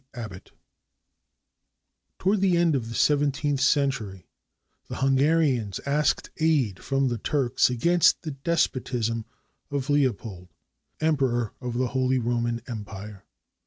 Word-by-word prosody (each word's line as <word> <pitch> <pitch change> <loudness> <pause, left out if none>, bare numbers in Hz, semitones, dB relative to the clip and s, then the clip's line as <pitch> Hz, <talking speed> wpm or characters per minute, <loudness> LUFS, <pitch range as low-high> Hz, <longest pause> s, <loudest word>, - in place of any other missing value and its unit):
ABBOTT 105 -6 -8 1.7
[Toward 195 +1 +1
the 185 -3 +3
end 170 -2 +3
of 115 -4 -2
the 115 - -6
seventeenth 145 0 +1
century, 130 - 0 0.6
the - - -6
Hunga 135 +4 +3
rians 125 - 0
asked 145 +2 0
aid 145 - +1
from 135 -1 +1
the 120 -2 -3
Turks 130 0 +1
against 170 +8 +3
the 155 - -4
despotism 130 -6 -1 0.4
of 140 -1 -2
Leo 145 -3 +4
pold, 95 -3 -10 0.5
Emperor 135 -7 +1
of 125 -2 -4
the 125 -1 0
Holy 130 +1 +1
Roman 120 -1 -1
Empire. 105 -3 -8
130 Hz, 125 wpm, -26 LUFS, 115-145 Hz, 1.7 s, Leo